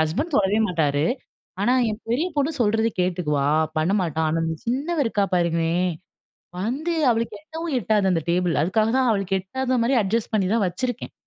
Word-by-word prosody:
Husband 220 - -1
தொடவே 205 +1 +2
மாட்டார். 150 -5 +1 0.6
ஆனா, 245 - +3 0.2
என் 215 +2 -6
பெரிய 285 +9 +1
பொண்ணு 285 +1 +2
சொல்றத 220 0 +2
கேட்டுக்குவா, 155 -6 0 0.3
பண்ண 165 +5 +1
மாட்டா. 160 -2 -2
ஆனா, 165 +1 0
இந்த 160 0 -2
சின்னவ 285 +8 -1
இருக்கா 205 -3 +1
பாருங்களேன், 170 +1 +1 0.7
வந்து 275 - -2 0.2
அவளுக்கு 230 0 -1
எட்டவும் 320 0 -5
எட்டாது 210 -2 +1
அந்த 165 - +1
டேபிள், 175 -1 +1
அதுக்காக 215 +6 +1
தான் 255 -2 +3
அவளுக்கு 195 -3 0
எட்டாத 255 +6 -2
மாரி 245 +4 +2
அட்ஜஸ்ட் 215 +4 -1
பண்ணி 195 -3 +2
தான் 230 -3 +2
வச்சிருக்கேன். 245 +7 -4
205 Hz, 165 wpm, -23 LUFS, 175-245 Hz, 0.7 s, ஆனா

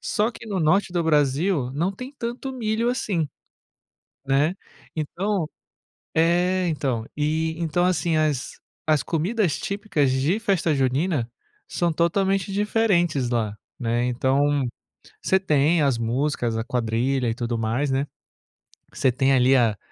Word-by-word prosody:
Só 485 - 0
que 230 - -12
no 195 -4 -2
norte 175 +4 +2
do 175 - +1
Brasil 150 -1 +1
não 170 +7 0
tem 250 +8 -8
tanto 245 +3 -4
milho 230 -1 0
assim, 185 - -1 1.0
né, 140 +6 +2 0.4
então 175 +3 -2 0.7
é 175 +3 +2
então, 130 -8 -1
e 160 +2 0
então, 170 +1 0
assim, 175 -3 +1
as 150 -4 -1 0.3
as 155 -2 +3
comidas 180 +2 0
típicas 200 -9 0
de 140 +10 +1
festa 190 -7 +1
junina 135 0 0 0.4
são 170 -1 0
totalmente 195 +4 +1
diferentes 190 - +1
lá, 115 -4 0 0.2
né, 120 0 0
então, 135 +3 +1 0.6
você 190 - +2
tem 155 -2 +2
as 135 -5 +1
músicas, 120 0 -1
a 115 - -1
quadrilha 125 +1 0
e 115 - -2
tudo 120 -1 -2
mais, 115 +5 -1
né, 135 +2 0 0.9
você 130 - +2
tem 135 +2 +2
ali 130 +1 +5
a 115 -4 +2
155 Hz, 135 wpm, -24 LUFS, 130-185 Hz, 1.0 s, ali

